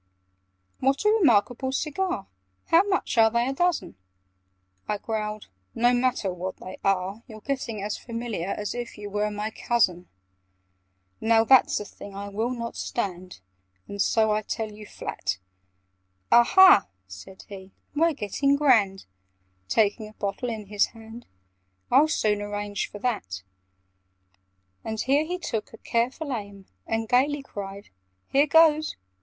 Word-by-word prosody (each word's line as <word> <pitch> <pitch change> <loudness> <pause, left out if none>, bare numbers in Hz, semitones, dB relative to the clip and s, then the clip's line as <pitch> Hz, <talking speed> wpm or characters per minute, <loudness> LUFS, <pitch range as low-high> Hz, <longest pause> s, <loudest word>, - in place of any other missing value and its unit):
"What 275 +8 +1
a - - +6
re 445 - +3
markable 245 - +3
cigar! 305 - -2 0.4
How 330 - +7
much 385 - 0
are 225 0 +7
they 235 +2 +1
a 270 - -1
dozen?" 350 - -1 0.9
I 210 - -1
growled 215 0 -4 0.3
"No 240 +1 +3
matter 245 -6 0
what 185 +1 -5
they 185 - -9
are! 195 +2 0
You're 220 -3 -10
getting 230 -4 -4
as 210 +1 -3
familiar 230 -7 -4
As 205 +1 -3
if 240 -2 -6
you 205 -1 -8
were 210 +1 0
my 210 +1 -4
cousin! 185 -8 0 1.1
"Now 225 0 +4
that's 260 +2 +5
a 210 - -6
thing 200 0 -11
I 200 0 -6
will 220 +4 -2
not 235 -2 -5
stand, 185 - -4 0.5
And 200 0 -4
so 220 +1 +3
I 210 0 +1
tell 220 0 -4
you 210 0 -11
flat." 95 - -4 0.9
"Aha," 305 - +7 0.2
said 95 - -12
he, 190 -2 -10 0.3
"we're 330 +2 +3
getting 275 +5 +1
grand!" 225 -10 +3 0.6
(Taking 215 0 +1
a - - -17
bottle 205 +4 -3
in 220 -2 -5
his 205 0 +1
hand) 225 +2 -12 0.6
"I'll 280 +5 +6
soon 210 -8 0
arrange 205 0 -3
for - - -9
that!" 200 - -3 1.4
And 220 0 -4
here 280 +6 +2
he 355 +3 -3
took 225 -11 -4
a - - -10
careful 255 +7 -1
aim, 200 -4 -7 0.2
And 225 0 -1
gaily 275 +4 +2
cried 200 -4 -8 0.4
"Here 280 +2 +4
goes!" 310 0 +4
220 Hz, 145 wpm, -26 LUFS, 205-260 Hz, 1.4 s, How